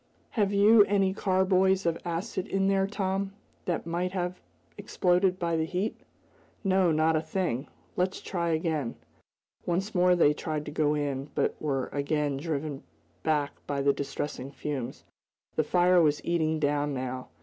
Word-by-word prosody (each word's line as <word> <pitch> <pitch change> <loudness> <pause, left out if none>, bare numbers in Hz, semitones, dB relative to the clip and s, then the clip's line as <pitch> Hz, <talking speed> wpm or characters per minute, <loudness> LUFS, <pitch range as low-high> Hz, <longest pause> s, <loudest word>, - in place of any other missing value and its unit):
"Have 205 -4 +1
you 205 +2 +7
any 195 -2 +2
carboys 190 0 +2
of 170 -1 +2
acid 180 +2 -3
in 195 0 +1
there 195 0 +2
Tom, 195 -1 -2 0.3
that 175 -3 -1
might 175 +2 -2
have 180 -1 -3 0.3
exploded 180 +1 +1
by 170 -2 -1
the 160 0 +1
heat?" 190 +5 -2 0.7
"No; 190 -3 +3
not 160 +1 +3
a 155 - +2
thing. 155 -5 -2 0.3
Let's 185 +1 0
try 170 -2 -2
again." 160 -6 -1 0.7
Once 190 +5 -1
more 180 -1 +4
they 150 -4 +5
tried 150 -1 -4
to - - -6
go 150 0 +1
in, 140 -1 -2
but - - +1
were 135 -4 0
again 145 0 -1
driven 145 -2 -3 0.4
back 145 +2 +1 0.2
by 140 -1 -1
the 140 0 +4
distressing 140 -1 -4
fumes. 135 -2 -5 0.5
The 155 - +2
fire 180 +2 +4
was 150 -2 +1
eating 160 -2 +1
down, 145 -1 0
now. 130 0 -4
170 Hz, 155 wpm, -28 LUFS, 145-190 Hz, 0.7 s, you